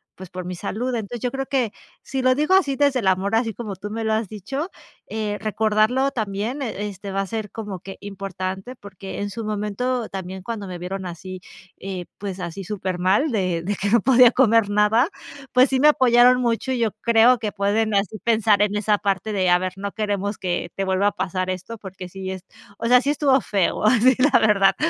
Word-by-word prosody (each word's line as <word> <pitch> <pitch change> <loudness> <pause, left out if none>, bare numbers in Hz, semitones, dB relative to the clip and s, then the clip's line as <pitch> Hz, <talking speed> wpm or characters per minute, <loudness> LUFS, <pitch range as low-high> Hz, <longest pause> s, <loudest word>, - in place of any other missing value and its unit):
pues, 190 -1 -10
por 185 -1 -7
mi 180 0 -5
salud. 245 +8 -3
Entonces 230 +1 -4
yo 250 - -1
creo 270 +1 -4
que 260 -6 -1 0.3
si 265 -1 -3
lo 255 0 +3
digo 300 +6 +1
así 295 -8 +3
desde 280 -3 +2
el 195 - -1
amor, 190 +3 +1
así 225 -1 +1
como 210 -2 -6
tú 200 +3 -7
me 225 +1 -4
lo 220 - +1
has 220 -2 -1
dicho, 270 - -5 0.4
eh, 215 -1 -3
recordarlo 220 +5 +1
también 220 +4 -3
e 215 -5 -3
este 200 0 -7
va 195 - -2
a 195 - -1
ser 215 -1 -5
como 205 -5 -6
que 195 - -9
importante 195 +3 -6
porque 195 -2 -9
en 205 - -2
su 225 +3 -6
momento 215 +3 -2
también 190 0 -6
cuando 210 0 -5
me 180 -1 -6
vieron 190 +2 -5
así, 180 +1 -7 0.4
eh, 190 -2 -5
pues 195 -2 -6
así, 175 +2 -5
supermal, 190 - 0
de 185 -5 0
de 205 +4 -2
que 200 +2 -2
no 235 +3 +5
podía 250 -2 +6
comer 230 -5 +3
nada. 210 - +3 0.4
Pues 255 +1 +5
sí, 265 -1 0
me 300 - +7
apoyaron 250 -2 +5
mucho, 235 +2 0
y 255 - -1
yo 225 -2 +1
creo 235 +1 +5
que 210 -1 -3
pueden 210 +2 0
así 200 +1 0
pensar 220 -1 +3
en 210 0 +1
esa 210 0 +2
parte 200 +1 -1
de: 185 -2 +1
“A 180 - +6
ver, 185 0 -3
no 200 +1 -5
queremos 205 -1 -2
que 175 -1 -3
te 195 - -2
vuelva 190 +1 +1
a - - +2
pasar 185 -1 -3
esto 185 +5 -5
porque 190 -3 -9
sí 190 +1 -6
es 190 -1 -8 0.3
o 230 - -5
sea, 250 +1 +6
sí 275 - -1
estuvo 275 -3 +3
feo 195 -5 0
así, 250 +3 +5 0.2
la - - +6
verdad". 200 -3 +4
210 Hz, 215 wpm, -22 LUFS, 190-235 Hz, 0.4 s, me